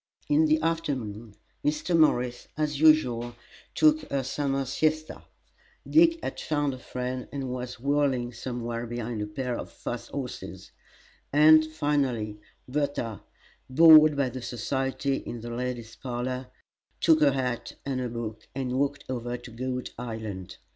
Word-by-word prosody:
In 305 +2 +4
the 310 +1 +3
afternoon 120 -10 -2 0.3
Mrs. 150 +4 0
Morris, 125 -6 +2
as 150 -2 -1
usual, 120 -7 +4 0.4
took 310 0 +5
her 140 -1 0
summer 135 +1 -1
siesta; 155 +4 -1 0.7
Dick 330 +1 +5
had - - -4
found 145 -3 0
a 130 - -8
friend, 125 0 -4
and 135 -2 -4
was 125 0 -5
whirling 135 -3 +1
somewhere 120 -1 -4
behind 120 -1 -4
a 105 - -2
pair 125 +3 -3
of - - -6
fast - - -6
horses; - - -6 0.6
and, 155 +2 +7
finally, 135 -9 -1 0.3
Bertha, 135 -6 -2 0.5
bored 155 +1 +8
by 140 -2 +2
the 130 +1 -7
society 135 +3 -1
in 120 - -7
the 120 +1 -6
ladies' 120 -1 -4
parlor, 125 0 -4 0.5
took 160 -2 +4
her 140 -2 +5
hat 125 -3 -2
and 135 -2 -1
a 125 - -2
book 110 -2 -6
and 130 -2 -2
walked 140 0 -1
over 120 -1 -3
to 120 0 -12
Goat 125 +2 -4
Island. 110 -6 -6
130 Hz, 140 wpm, -27 LUFS, 120-145 Hz, 0.7 s, bored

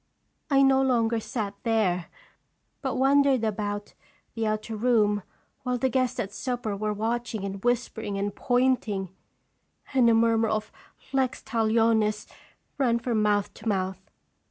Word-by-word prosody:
I 275 -1 +5
no 270 0 +5
longer 235 -3 +2
sat 215 -3 -4
there, 200 -7 +1 0.7
but 265 -2 -2
wandered 270 -1 +4
about 205 -1 -3 0.4
the 225 -1 -1
outer 215 +1 -2
room 210 -3 +2 0.4
while 250 -1 -1
the 260 +2 +1
guests 255 0 0
at 200 0 -3
supper 245 -4 -3
were 210 +1 -2
watching 225 0 -2
and 195 0 -6
whispering 235 -4 -1
and 200 0 -2
pointing, 245 -7 +1 0.8
and 250 -3 +5
a 230 - +5
murmur 225 0 +3
of 215 0 -2 0.4
'Lex 260 -1 0
lalionis! 220 -2 +2 0.3
' - - -44
ran 240 -4 +3
from 235 -2 0
mouth 205 -1 +1
to 220 - -9
mouth. 190 -2 -1
225 Hz, 140 wpm, -26 LUFS, 210-250 Hz, 0.8 s, I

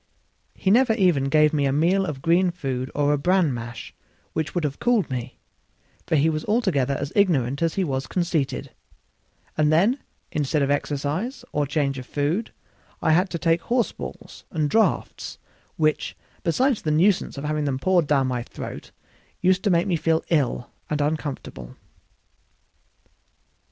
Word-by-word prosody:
He 190 - +1
never 245 +1 +5
even 180 - +3
gave 150 +2 +4
me 145 -2 +2
a - - +1
meal 180 +7 +2
of 135 -4 -5
green 175 +2 +4
food 135 -7 -3
or 145 0 +2
a 145 - 0
bran 180 -2 +2
mash, 120 0 -7 0.4
which 160 +2 -3
would 175 - 0
have 145 -2 -2
cooled 240 - +2
me, 125 0 -4 0.7
for - - +2
he 150 +1 +4
was 155 -1 -1
altogether 190 - +1
as 140 - -4
ignorant 140 - +2
as 165 -1 +1
he 195 - +1
was 135 -5 -2
conceited; 170 -6 -1 0.8
and 155 -1 +3
then, 205 - +3 0.3
instead 150 0 0
of 140 - +1
exercise 150 - -2
or 145 -1 0
change 140 -2 0
of 130 - -9
food, 155 +10 -1 0.5
I - - +2
had 180 +4 +3
to 170 - -3
take 165 0 +2
horse 240 +4 +1
balls - - -9
and 155 -3 -1
draughts; 225 0 0 0.4
which, 155 -1 0 0.2
beside 250 - +2
the 155 - -3
nuisance 175 +2 +2
of 140 - -5
having 150 0 -1
them 135 -2 0
poured 175 +2 +2
down 140 -2 +3
my 125 -2 -1
throat, - - -8 0.5
used 185 +1 +2
to - - +4
make 170 -1 +3
me 180 -4 +1
feel 160 0 +1
ill 135 -6 0 0.2
and 150 - -1
uncomfortable. 145 - -3
155 Hz, 165 wpm, -24 LUFS, 140-180 Hz, 0.8 s, never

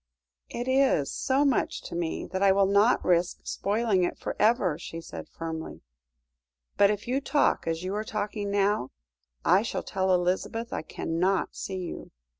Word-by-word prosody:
"It 240 +1 -4
is 260 - +3
so 275 +2 +1
much 270 -4 0
to - - -7
me 170 -1 -2
that 190 +1 -2
I 200 -1 +6
will 195 0 +4
not 200 +5 +3
risk 175 0 +2
spoiling 205 -2 0
it 175 - -1
for - - -4
ever," 210 -8 +3
she 165 -1 -7
said 165 - -9
firmly; 160 -1 -6 0.9
"but 200 - +5
if 210 +1 -2
you 260 +3 0
talk 290 - +1
as 165 +1 -1
you 185 +1 -3
are 210 +1 -1
talking 210 -1 -3
now, 200 -8 +1 0.6
I 185 +3 +5
shall 225 - -3
tell 190 -1 0
Elizabeth 185 +6 0
I - - -2
cannot 175 +4 -1
see 190 - -4
you." 180 -2 -6
195 Hz, 170 wpm, -27 LUFS, 175-220 Hz, 0.9 s, I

